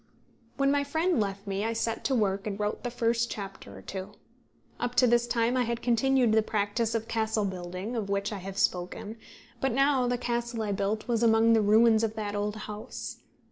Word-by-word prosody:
When 275 0 +3
my 285 0 +2
friend 320 +2 +1
left 200 -1 -2
me, 195 0 -2
I 225 +1 0
set 225 0 -2
to 270 - +2
work 200 -3 0
and 200 -1 -4
wrote 210 0 -2
the 245 - -2
first 235 0 0
chapter 195 -2 -7
or - - -12
two. 195 +1 -6 0.7
Up 245 0 -2
to 250 - +5
this 240 0 +3
time 235 +1 +1
I 255 - +2
had 235 -1 -2
continued 245 0 +3
that 220 0 +3
practice 215 +2 0
of 225 0 -2
castle 220 -2 0
building 185 +4 -5
of 210 -4 -3
which 200 +2 -1
I 200 - -4
have 195 +1 -7
spoken; 205 +3 -1 0.4
but 270 - +1
now 270 0 +3
the 245 0 +1
castle 235 -1 -2
I 210 - -2
built 200 +2 -1
was 235 -2 +1
among 225 0 +5
the 225 - +4
ruins 220 +2 +5
of 220 -1 -1
that 210 -2 -3
old 205 +1 -1
house. 210 0 -7
225 Hz, 210 wpm, -28 LUFS, 205-240 Hz, 0.7 s, to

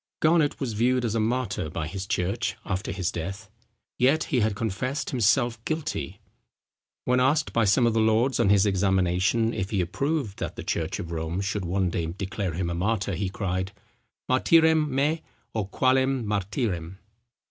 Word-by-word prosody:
Garnet 155 -2 +3
was 130 -5 -2
viewed 125 +3 +2
as 110 - -1
a 115 - +1
martyr 110 -6 -1
by 80 -1 -3
his 95 +4 -5
church 100 +7 -1
after 95 +1 -2
his 90 -1 -2
death. 90 +4 -6 0.5
Yet 140 +5 +4
he 130 - 0
had 110 -2 +1
confessed 120 +8 -2
himself 120 -1 +2
guilty. 155 - -3 0.9
When 125 0 +3
asked 145 +4 +2
by 115 -2 +3
some 110 +5 +4
of 115 - +2
the 115 - +2
lords 110 +4 +2
on 115 -4 +3
his 100 0 +5
examination, 95 +3 +2
if 95 - -3
he 105 -3 -1
approved 110 - -1
that - - -4
the - - -6
church - - -2
of 85 - -6
Rome 80 +2 -3
should 100 -1 -2
one 90 0 0
day 85 -2 -2
declare 95 +1 -3
him 85 -1 -2
a - - -1
martyr, 100 +3 -1
he 95 +2 -2
cried, 95 0 -3 0.5
Martyrem 160 +3 +4
me, 145 +4 +1 0.3
O 110 -3 -1
qualem 130 +3 +2
Martyrem. 95 -3 -2
105 Hz, 170 wpm, -26 LUFS, 95-130 Hz, 0.9 s, his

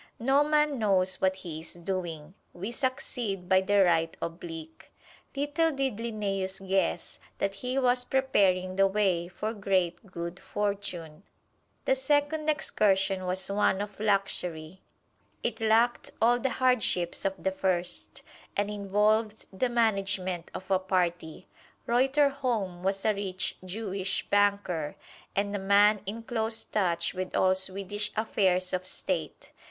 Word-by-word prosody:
No 270 +4 +3
man 300 -2 +2
knows 190 -3 +2
what 190 0 +3
he 170 -4 -6
is 165 - -3
doing: 170 -3 -4 0.2
we 195 +6 -5
succeed 240 -7 -2
by 190 +1 +5
the 200 +1 +4
right 165 -2 +2
oblique. 165 -1 -7 0.4
Little 290 +4 +1
did 270 -6 -1
Linnæus 195 -4 -2
guess 190 0 0 0.2
that 200 0 -1
he 250 +6 -3
was 250 -1 +3
preparing 195 -9 +2
the 195 0 +5
way 190 -4 +1
for 215 +4 -4
great 190 -3 0
good 170 -1 -6
fortune. 195 -6 -3 0.6
The - - +4
second 290 +3 +1
excursion 195 -9 +1
was 185 +2 -1
one 200 -1 +2
of 205 0 -5
luxury. 190 -5 -1 0.6
It 225 -1 -2
lacked 225 +2 +3
all 240 +2 +4
the 265 - 0
hardships 240 -9 +1
of 195 0 0
the 190 - +1
first, 180 -2 -1 0.3
and 205 +1 0
involved 210 +2 +1
the 245 +7 0
management 195 -6 0
of 185 +1 -7
a 190 - +4
party. 180 -3 -1 0.4
Reuterholm 255 -7 +1
was 195 +1 -1
a 215 - +4
rich 190 -2 -3
Jewish 190 0 -3
banker, 200 -7 +1 0.4
and 200 +1 0
a - - -1
man 200 +1 +4
in 225 +3 -5
close 225 -1 -1
touch 180 -5 0
with 185 0 -4
all 185 0 +4
Swedish 195 +2 -3
affairs 185 -4 +2
of 185 0 -2
State. - - -3
195 Hz, 135 wpm, -28 LUFS, 185-225 Hz, 0.6 s, by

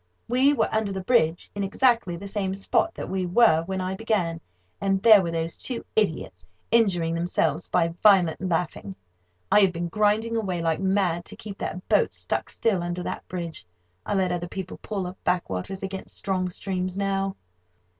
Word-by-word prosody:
We 255 +4 +4
were - - +2
under 220 -2 0
the 190 -1 -4
bridge, 175 -7 +2
in 205 - -3
exactly 230 -2 +2
the 200 +4 -7
same 195 -1 -2
spot 200 +11 0
that - - -5
we 190 -1 -2
were 175 -4 +5
when 190 0 -2
I 185 +1 -2
began, 190 -6 -1 0.4
and 195 -1 +1
there 220 -3 +9
were 170 - -2
those 165 0 -2
two 245 -3 -4
idiots, 155 - -1 0.2
injuring 185 -8 +3
themselves 165 -2 0
by 170 -1 +2
violent 190 -6 +5
laughing. 165 - -2 0.6
I - - +7
had 195 -3 +5
been 170 0 -4
grinding 215 +4 +1
away 190 -6 -1
like 165 -1 0
mad 190 -3 +1
to 210 - -10
keep 210 -2 -9
that 180 +3 -5
boat - - +3
stuck - - -3
still 200 -6 0
under 175 +1 -3
that - - -5
bridge. 170 - -5 0.4
I - - -2
let 185 -2 +1
other 175 0 -2
people 185 +1 -6
pull 200 -4 -3
up 180 +1 -9
backwaters 180 - -2
against 195 0 -6
strong 185 -2 -1
streams 185 0 -3
now. 195 -1 -1
190 Hz, 180 wpm, -25 LUFS, 175-205 Hz, 0.6 s, there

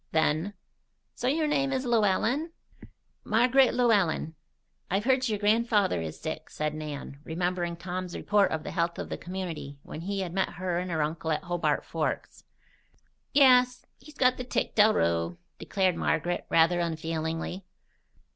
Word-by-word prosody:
Then: 160 +5 +1 0.6
"So 250 - -3
your 310 +4 +2
name 275 -2 +1
is 260 0 -1
Llewellen?" 240 - +1 0.7
"Marg'ret 250 +4 +4
Llewellen." 200 -10 +2 0.6
"I've 195 +2 0
heard 260 0 +2
your 215 - 0
grandfather 210 - +2
is 80 -1 -6
sick," - - -5
said 150 0 -2
Nan, 150 -2 -6
remembering 175 +1 -2
Tom's 180 0 -5
report 205 -1 +2
of 155 -1 -3
the - - -5
health 170 -1 -1
of - - -5
the - - -4
community 175 -6 -6
when 155 - -8
he 195 +2 -2
had 175 -3 -4
met 190 0 0
her 180 -1 -2
and 180 +1 -4
her 160 -3 0
uncle 160 +1 -3
at 155 - -1
Hobart 175 -1 0
Forks. - - -3 0.9
"Yes. 250 -3 +5
He's 295 +3 -15
got 255 -1 +3
the 250 - -4
tic 250 - -2
del 215 0 +5
rew," 85 - 0 0.2
declared 190 -3 +1
Margaret, 175 +1 -1
rather 165 +2 +4
unfeelingly. 165 +2 -3
185 Hz, 155 wpm, -28 LUFS, 165-235 Hz, 0.9 s, Yes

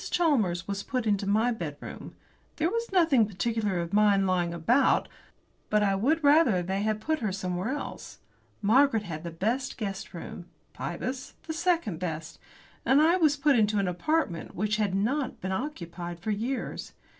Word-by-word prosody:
Chalmers 225 - +1
was 200 0 -2
put 255 +1 -2
into 205 -2 +1
my 220 +4 +3
bedroom. 160 -10 -7 0.4
There 320 +3 0
was 465 -1 -2
nothing 320 - +4
particular 210 0 -1
of 170 +2 -6
mine 205 -2 +4
lying 180 -2 +1
about, 235 - +2 0.6
but 210 0 +3
I 200 -1 +2
would 285 +12 +1
rather 285 - +5
they 190 +3 -2
had 215 0 0
put 315 +7 -1
her 215 -6 -1
somewhere 185 +2 -3
else. 290 +2 -6 0.5
Margaret 235 +1 +4
had 160 -5 -6
the 170 - -4
best 225 +11 -2
guest 195 -5 -5
room, 175 +1 -8 0.3
Pybus 250 +9 -5
the 320 - -4
second 330 - 0
best, 165 -2 -5 0.4
and 265 +2 +4
I 330 +4 +5
was 305 -4 +3
put 285 -1 +3
into 215 -2 +3
an 195 -2 +1
apartment 180 - -1
which 210 +2 0
had 205 -3 0
not 255 +7 -1
been 190 - -4
occupied 175 - -5
for 215 +5 -2
years. 235 +6 -3
210 Hz, 165 wpm, -28 LUFS, 185-275 Hz, 0.6 s, rather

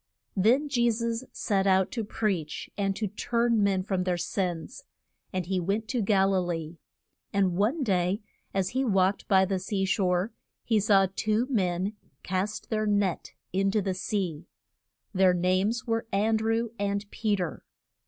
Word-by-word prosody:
Then 235 +10 +3
Je 240 -4 +2
sus 230 +1 -1
set 195 -2 0
out 190 -1 +3
to 230 - -2
preach 195 -7 -2
and 195 -1 0
to 215 - -2
turn 230 +2 +1
men 195 -2 +2
from 185 -2 -1
their 180 -1 0
sins. 180 - -3 0.5
And 185 -2 -2
he 190 +1 0
went 200 +5 -1
to 245 - 0
Gal 195 -1 +3
i - - +3
lee. 165 -2 -4 0.5
And 190 -3 +2
one 230 - +1
day 185 -2 +1 0.3
as 190 -1 0
he 260 +2 0
walked 195 -4 +2
by 190 -2 +5
the 190 0 -1
sea 195 +1 -1
shore 190 +1 +1 0.3
he 225 -2 +2
saw 200 -2 +4
two 215 +3 +1
men 185 -2 0 0.3
cast 190 +5 -3
their 215 -1 +1
net 200 -3 0 0.2
in 195 +1 +2
to 210 +2 +2
the 190 -2 -1
sea. 185 -5 -3 0.7
Their 185 -1 +4
names 185 +6 +1
were 225 -1 -1
An 215 +3 +2
drew 225 +1 0
and 200 0 -1
Pe 215 -2 0
ter. 180 -5 -4
195 Hz, 165 wpm, -28 LUFS, 185-220 Hz, 0.7 s, by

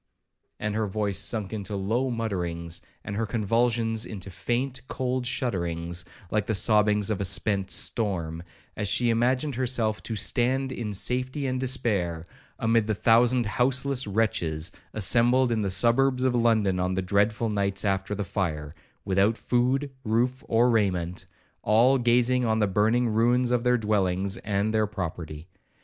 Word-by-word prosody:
and 105 0 -2
her 110 0 -1
voice 100 -1 -1
sunk 105 0 -1
into 105 -1 -4
low 110 +7 -1
mutterings, 85 -8 -3 0.2
and 100 - -5
her 110 +1 -1
convulsions 115 +1 0
into 100 -5 -8
faint, 125 +9 -2
cold 130 -1 -2
shudderings, 85 - -2 0.3
like 105 -1 0
the 110 - +1
sobbings 105 +1 +3
of 100 - -2
a - - +1
spent 95 +1 0
storm, 85 -10 -1 0.3
as 105 - -2
she 115 +4 +2
imagined 125 +5 +1
herself 120 -4 0
to 115 - -4
'stand 125 +6 +1
in 115 -4 -4
safety 130 +7 -1
and 130 -1 -1
despair,' 100 -11 0 0.3
amid 115 -1 +1
the 110 - 0
thousand 120 +3 +3
houseless 130 +3 0
wretches 95 -6 -1 0.2
assembled 120 +4 +3
in 110 -2 0
the 100 - -1
suburbs 125 +6 +2
of 130 -1 +2
London 110 -6 +2
on 90 +1 -1
the 95 - 0
dreadful 105 +4 +1
nights 100 -1 -1
after 95 +1 -1
the 105 - -2
fire, 80 -7 -3 0.3
without 100 +3 +2
food, 130 +3 0
roof, 120 +3 0
or 120 +2 +3
raiment, 90 -6 -1 0.3
all 120 +6 +4
gazing 125 +1 +3
on 110 -2 +1
the 110 - +2
burning 110 +5 +2
ruins 120 +3 +2
of 120 -1 +1
their 125 0 +3
dwellings 100 -3 0
and 105 +1 -1
their 110 -1 +2
property. 85 -6 -6
110 Hz, 155 wpm, -26 LUFS, 95-120 Hz, 0.3 s, all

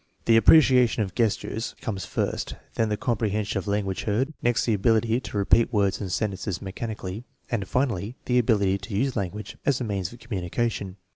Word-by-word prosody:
The 115 - +5
appreciation 125 -2 +6
of 95 -3 -6
gestures 115 0 -1
comes 95 -5 -4
first, - - -2 0.2
then 110 -1 0
the 105 - -1
comprehension 110 -2 -1
of 100 - -8
language 100 -2 -1
heard, 125 +8 0
next 120 -1 +2
the 115 - +2
ability 115 +3 +2
to 115 - -6
repeat 105 +4 +3
words 100 -3 +1
and 95 -3 -4
sentences 100 -2 -2
mechanically, 105 +1 -5 0.3
and 100 -6 -1
finally 120 -3 -1
the 125 0 +3
ability 100 -5 +2
to 100 +1 -6
use 135 +3 0
language 105 0 -4
as 140 -3 +1
a - - -2
means 100 -5 -2
of 120 - -11
communica 115 +1 -2
tion. 95 -3 -6
110 Hz, 185 wpm, -25 LUFS, 100-120 Hz, 0.3 s, appreciation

